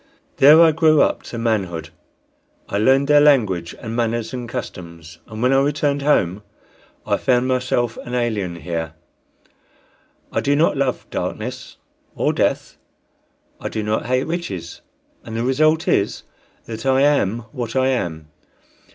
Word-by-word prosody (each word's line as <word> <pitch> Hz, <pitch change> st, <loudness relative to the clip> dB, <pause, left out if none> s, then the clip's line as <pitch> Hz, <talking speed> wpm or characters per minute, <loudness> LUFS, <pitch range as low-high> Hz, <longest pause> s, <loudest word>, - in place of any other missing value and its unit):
There 150 Hz, +4 st, +8 dB
I 165 Hz, -, +6 dB
grew 155 Hz, 0 st, +3 dB
up -, -, 0 dB
to 120 Hz, -, -6 dB
manhood. 95 Hz, -8 st, -2 dB, 0.8 s
I 100 Hz, -, -2 dB
learned 135 Hz, +5 st, +3 dB
their 145 Hz, 0 st, +6 dB
language 105 Hz, -, +2 dB
and 115 Hz, -1 st, -6 dB
manners 115 Hz, 0 st, -1 dB
and 120 Hz, -2 st, -5 dB
customs, 85 Hz, -8 st, -8 dB
and 110 Hz, +1 st, -6 dB
when 130 Hz, +1 st, +3 dB
I 135 Hz, -, +4 dB
returned 145 Hz, 0 st, 0 dB
home 105 Hz, -, +1 dB, 0.6 s
I -, -, +1 dB
found 125 Hz, 0 st, +1 dB
myself 125 Hz, -2 st, 0 dB
an 120 Hz, -, -6 dB
alien 110 Hz, -8 st, -1 dB
here: 80 Hz, -1 st, -5 dB, 1.4 s
I -, -, -1 dB
do 140 Hz, +1 st, +1 dB
not 155 Hz, +3 st, +2 dB
love 135 Hz, -2 st, -1 dB
darkness -, -, -5 dB, 0.4 s
or -, -, 0 dB
death, -, -, -1 dB, 0.8 s
I -, -, -4 dB
do 110 Hz, -, -3 dB
not 105 Hz, +2 st, -2 dB
hate 130 Hz, +1 st, +1 dB
riches, 100 Hz, -, -5 dB, 0.4 s
and 115 Hz, -, -8 dB
the 115 Hz, -, -1 dB
result 155 Hz, +5 st, +2 dB
is -, -, 0 dB, 0.4 s
that 110 Hz, -1 st, -7 dB
I 135 Hz, 0 st, +2 dB
am 130 Hz, -6 st, +2 dB
what 120 Hz, -4 st, -5 dB
I 130 Hz, 0 st, +2 dB
am. 80 Hz, -11 st, -3 dB
120 Hz, 150 wpm, -20 LUFS, 100-140 Hz, 1.4 s, There